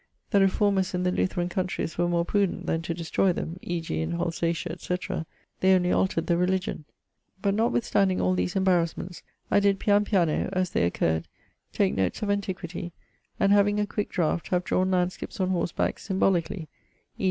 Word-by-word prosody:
The 200 - +5
reformers 195 -1 +2
in 180 - -1
the 180 - +2
Lutheran 180 -1 0
countrys 180 -3 -2
were 175 0 +1
more 170 -1 +1
prudent 200 -1 0
then 165 - 0
to 170 +1 -3
destroy 175 +3 +1
them 170 +1 -5
(e.g. 165 -2 -3
in 160 +1 -2
Holsatia, 170 0 -1
etc.); 175 -1 -4 0.3
only 185 -1 +4
altered 175 -3 +1
the 170 - +2
religion. 185 -2 -1 0.5
But 200 0 +1
notwithstanding 205 -3 +1
all 90 +1 +2
these 90 0 -1
embarasments 180 -2 0 0.3
I - - +5
did 200 -1 +2
pian 205 0 +3
piano 180 -7 +1
(as 185 -2 0
they - - +2
occur'd) 80 -1 0 0.4
take - - +1
notes 95 - -1
of 205 - +1
antiquity; 185 -3 -4 0.5
and 195 - +3
having 205 +1 +4
a 210 - +2
quick 205 0 -3
draught, 170 -2 0
have 180 -1 0
drawne 185 +1 +1
landskips 180 +1 -1
on 185 0 +1
horseback 175 -2 -1
symbolically, 185 -4 0 0.5
e. - - -30
180 Hz, 170 wpm, -26 LUFS, 170-195 Hz, 0.5 s, The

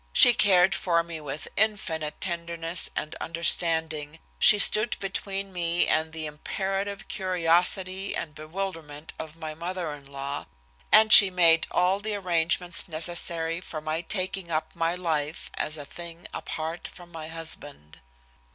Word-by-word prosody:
She 245 - +8
cared 190 -4 +4
for 170 -2 +1
me 165 -2 -7
with 145 0 -6
infinite 165 -8 -1
tenderness 170 -1 -2
and 155 - -4
understanding, 160 -2 0 0.2
she 210 - +8
stood 215 +2 +4
between 195 0 -4
me 170 -1 +1
and 160 0 0
the 160 0 -6
imperative 195 +6 -4
curiosity 185 +1 0
and 155 -3 -5
bewilderment 155 -2 -7
of 160 -1 -7
my 160 -2 -7
mother 170 0 -5
in 140 -2 -13
law, 140 +1 -6 0.4
and 215 0 +7
she 200 - +11
made 170 -3 +5
all 185 +2 +1
the 215 0 -4
arrangements 175 -1 0
necessary 165 0 -3
for 160 -4 -7
my 155 +1 -3
taking 185 0 -3
up 155 -1 -3
my 165 +1 -1
life 160 -4 -3
as 155 +1 -2
a 145 - -8
thing 170 +2 -9
apart 160 +2 -5
from 175 -1 -15
my 160 -2 -8
husband. 160 - -6
170 Hz, 140 wpm, -26 LUFS, 160-185 Hz, 0.4 s, she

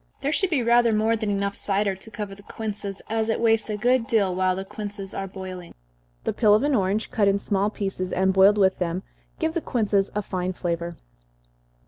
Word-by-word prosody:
There 280 +1 0
should 385 +3 +1
be 290 -8 +1
rather 235 0 +4
more 220 +2 +2
than 215 -1 -2
enough 200 0 -1
cider 200 0 0
to 190 +4 -10
cover 210 -2 -6
the 200 - -13
quinces, 205 -2 -5
as 220 0 -1
it 225 - 0
wastes 225 -1 +2
a 210 - -2
good 245 +2 +2
deal 200 -5 +2
while 185 0 +1
the 190 +1 -5
quinces 205 -1 -3
are 195 - -4
boiling. 185 -2 -8 0.5
The - - -1
peel 210 -3 +5
of 215 - +2
an 290 0 +2
orange, 205 -1 0
cut 205 -3 +2
in 200 0 +3
small 200 0 0
pieces, 195 -3 -4
and 190 +1 +2
boiled 195 +2 +6
with 190 -2 +3
them, 180 +1 -2 0.3
gives 320 -1 -1
the 335 - -1
quinces 205 -7 +1
a 210 - -1
fine 185 -1 -3
flavor. 170 -1 -3
200 Hz, 210 wpm, -24 LUFS, 190-225 Hz, 0.5 s, boiled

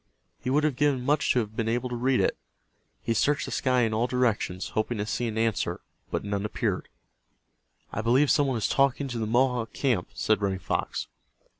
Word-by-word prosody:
He 125 - -4
would 145 +3 +3
have 155 -4 +1
given 135 -3 +1
much 145 +1 +2
to 125 - +3
have 110 -1 -7
been 115 -1 -1
able 120 +2 0
to 125 - -3
read 125 +2 +2
it. - - +1 0.7
He 115 - 0
searched 145 +6 +1
the - - -6
sky 130 -2 +2
in 115 -2 +1
all 115 +3 +1
directions, 115 -7 0
hoping 110 +2 -1
to 105 - -1
see 120 +2 -1
an 110 -1 -4
answer 115 -1 0 0.3
but - - -2
none 100 -1 -2
appeared. 105 - -2 1.0
"I 110 - -1
believe 130 +6 +3
some 145 -2 +3
one 130 -3 0
is 110 - 0
talking 140 0 +2
to 120 -2 -3
the 110 - -1
Mohawk 120 -1 +1
camp," 115 - 0
said 110 - +1
Running 95 -1 0
Fox. - - -2
120 Hz, 205 wpm, -27 LUFS, 110-130 Hz, 1.0 s, would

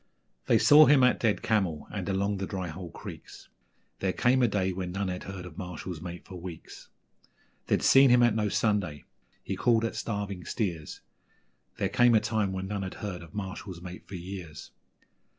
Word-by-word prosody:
They - - +5
saw 150 +1 +8
him 140 -3 +6
at 125 - +4
Dead 110 -3 +1
Camel 95 -8 0
and - - -4
along 100 +1 0
the 95 0 -3
Dry 95 -2 -4
Hole 85 +2 -7
Creeks - - -11 0.5
There 95 - 0
came 125 +6 +2
a 120 - +5
day 95 -3 0
when 90 -1 -4
none 95 +1 -2
had 90 0 -5
heard 95 -2 -7
of 90 0 -10
Marshall's 90 -2 -6
mate 90 0 -7
for 90 -2 -9
weeks; 85 -3 -9 0.8
They'd - - +1
seen 135 0 +7
him 120 0 +6
at 120 -2 +4
No 105 -1 0
Sunday, 100 -10 0 0.4
he - - -3
called 115 -2 +2
at 115 - -3
Starving 100 -4 -4
Steers 85 -9 -4 0.8
There - - 0
came 120 -1 +4
a - - +6
time 110 -3 -1
when 95 0 -4
none 100 0 -3
had 95 -1 -5
heard 100 -5 -5
of 85 +1 -13
Marshall's 95 -2 -6
mate 90 -1 -9
for 95 - -8
years. 90 -4 -8
95 Hz, 190 wpm, -28 LUFS, 90-110 Hz, 0.8 s, saw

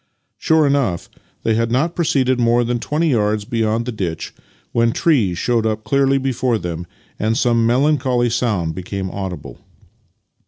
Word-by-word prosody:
Sure 160 -1 +3
enough, 135 -12 0 0.3
they 115 - +2
had 115 +1 +1
not 150 +8 0
proceeded 130 -6 +1
more 120 0 +3
than 120 0 -1
twenty 155 +7 0
yards 105 -4 +1
beyond 115 0 0
the 125 - -3
ditch 90 -7 -4 0.4
when 115 0 +2
trees 115 - +1
showed 120 +2 +1
up 110 -1 -1
clearly 135 +4 +2
before 130 -3 0
them 85 -2 -5 0.3
and 110 +1 0
some 115 -3 +2
melancholy 130 -1 +2
sound 105 -9 0
became 95 +2 -5
audible. 95 -3 -6
115 Hz, 150 wpm, -19 LUFS, 105-130 Hz, 0.4 s, Sure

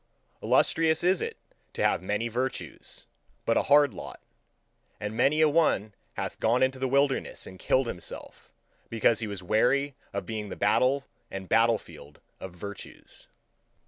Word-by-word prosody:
Illustrious 160 0 +2
is 185 +1 +3
it - - -4 0.4
to - - -2
have - - +2
many 105 +5 -1
virtues, 125 +3 -4 0.4
but 115 - +2
a - - +4
hard 145 -1 +6
lot; - - -9 0.8
and 105 +1 -4
many 140 +6 +3
a 155 - +6
one 145 -10 +2 0.2
hath - - -5
gone 120 +3 +3
into 130 0 0
the 130 - 0
wilderness 140 +1 +1
and 95 - -11
killed 130 0 +2
himself, 90 -7 -8 0.4
because 115 0 +2
he 110 - -3
was 100 -3 -6
weary 135 +9 +2 0.2
of - - -4
being 110 -2 -5
the - - -6
battle 135 +2 +2 0.2
and 95 -1 -6
battlefield 115 -11 0 0.2
of 95 - -7
virtues. 100 +3 -10
115 Hz, 150 wpm, -28 LUFS, 105-140 Hz, 0.8 s, hard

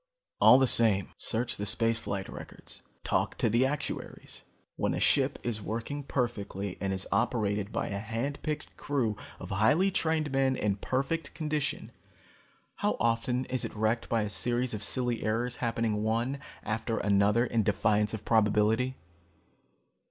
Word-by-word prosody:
"All 125 - +8
the 135 - +4
same, 110 -6 +3
search 120 +2 -2
the 100 - -3
space 115 +2 +1
flight 100 -3 -4
records, - - -10 0.2
talk - - 0
to 115 - +1
the 120 +4 +4
actuaries. 145 +2 -5 0.3
When - - 0
a - - -2
ship - - +2
is 115 -3 -2
working 115 +8 -4
perfectly 100 -8 -2
and 95 -1 0
is 95 0 -1
operated 105 -1 0
by - - -2
a 100 - -3
hand 115 +7 -3
picked 155 -1 -4
crew 130 -7 0 0.2
of - - -8
highly 145 - +3
trained 160 -4 0
men 135 -1 +2
in 105 -4 0
perfect 135 +9 -2
condition, 150 -2 -2 0.9
how - - 0
often 120 +2 +1
is 130 0 -1
it - - -5
wrecked 110 +2 0
by 115 -2 +2
a 105 - -3
series 120 +3 +1
of 105 - -4
silly 120 +2 -1
errors 120 +3 -1
happening 115 -3 0
one 115 +5 0 0.2
after 110 +1 -2
another 100 +3 +3
in 115 -2 +1
defiance 105 +1 +2
of 105 - -9
probability? 110 +3 +3
115 Hz, 155 wpm, -30 LUFS, 105-130 Hz, 0.9 s, All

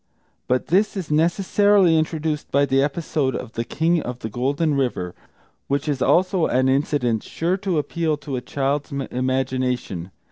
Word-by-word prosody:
But 125 0 0
this 200 +4 +2
is 175 -5 -4
necessarily 185 +3 +3
introduced 155 -1 -1
by 140 +1 +4
the 135 0 +2
episode 145 -2 -1
of 125 - -6
the 115 - -2
King 165 +7 +1
of 125 -2 -5
the 110 - -6
Golden 140 +7 0
River, 120 -10 -1 0.5
which 140 +2 -1
is, 140 -3 -1
also, 185 -1 +3
an 130 +1 +2
incident 130 -4 +1
sure 170 +3 -1
to 190 -4 -1
appeal 155 +1 -1
to 140 -2 -5
a 125 - -3
child's 140 +3 -2
imagination. 130 -7 -2
145 Hz, 155 wpm, -22 LUFS, 130-165 Hz, 0.5 s, by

